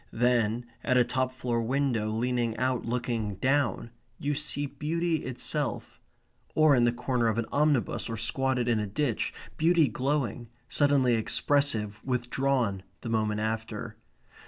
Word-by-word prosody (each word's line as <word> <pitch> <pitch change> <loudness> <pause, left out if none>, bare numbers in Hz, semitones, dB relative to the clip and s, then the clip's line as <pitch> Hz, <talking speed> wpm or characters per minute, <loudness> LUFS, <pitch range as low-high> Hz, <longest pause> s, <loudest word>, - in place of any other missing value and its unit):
Then, 120 -1 +2 0.2
at 130 - +2
a 125 - +6
top 130 +1 -1
floor 125 -2 -1
window, 120 -3 0
leaning 120 +1 0
out, 130 -2 0
looking 115 -4 -2
down, 130 +1 0 0.3
you 145 +1 -1
see 145 0 -2
beauty 165 +4 -1
itself; 130 -1 -3 0.6
or 155 -2 +6
in 120 -1 +4
the 120 - +4
corner 125 0 0
of 110 -1 0
an 115 - 0
omnibus; 145 -6 +1
or 115 - -3
squatted 130 +2 0
in 115 -2 +2
a 105 - -2
ditch 115 +4 -1 0.3
beauty 165 -1 +4
glowing, 125 -2 -1 0.2
suddenly 140 -4 +3
expressive, 110 -2 0
withdrawn 125 -4 0 0.2
the 120 - -5
moment 110 -1 0
after. 110 0 -3
125 Hz, 140 wpm, -28 LUFS, 115-140 Hz, 0.6 s, a